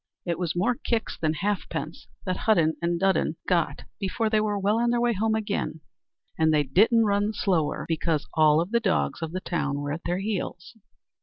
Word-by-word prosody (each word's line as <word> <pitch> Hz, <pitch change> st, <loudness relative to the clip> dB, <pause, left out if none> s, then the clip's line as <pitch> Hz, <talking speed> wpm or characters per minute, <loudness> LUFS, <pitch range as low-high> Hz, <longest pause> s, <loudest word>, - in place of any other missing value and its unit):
It 170 Hz, -2 st, -2 dB
was 175 Hz, -3 st, -2 dB
more 200 Hz, +8 st, +2 dB
kicks 230 Hz, -1 st, -2 dB
than 155 Hz, -1 st, -1 dB
halfpence 200 Hz, +4 st, -3 dB, 0.2 s
that 185 Hz, -1 st, -1 dB
Hudden 170 Hz, -8 st, +2 dB
and 170 Hz, 0 st, 0 dB
Dudden 190 Hz, -3 st, +1 dB
got 165 Hz, -6 st, 0 dB, 0.2 s
before 215 Hz, +3 st, -1 dB
they 215 Hz, -1 st, +3 dB
were 210 Hz, -1 st, 0 dB
well 205 Hz, +3 st, +1 dB
on 240 Hz, 0 st, +2 dB
their 240 Hz, 0 st, +2 dB
way 240 Hz, 0 st, +2 dB
home 220 Hz, +2 st, +1 dB
again, 205 Hz, -7 st, -2 dB, 0.6 s
and 160 Hz, 0 st, +4 dB
they 150 Hz, -1 st, +3 dB
didn't 220 Hz, -, +4 dB
run 205 Hz, 0 st, +2 dB
the 220 Hz, -, -3 dB
slower 170 Hz, -8 st, 0 dB
because 160 Hz, -1 st, -1 dB
all 155 Hz, +1 st, +4 dB
the 235 Hz, +6 st, +1 dB
dogs 195 Hz, -5 st, 0 dB
of 165 Hz, -1 st, -3 dB
the 185 Hz, +1 st, -4 dB
town 145 Hz, -6 st, -2 dB
were 145 Hz, 0 st, -3 dB
at 160 Hz, +3 st, -4 dB
their 175 Hz, -, 0 dB
heels. 195 Hz, 0 st, -4 dB
185 Hz, 200 wpm, -26 LUFS, 160-215 Hz, 0.6 s, and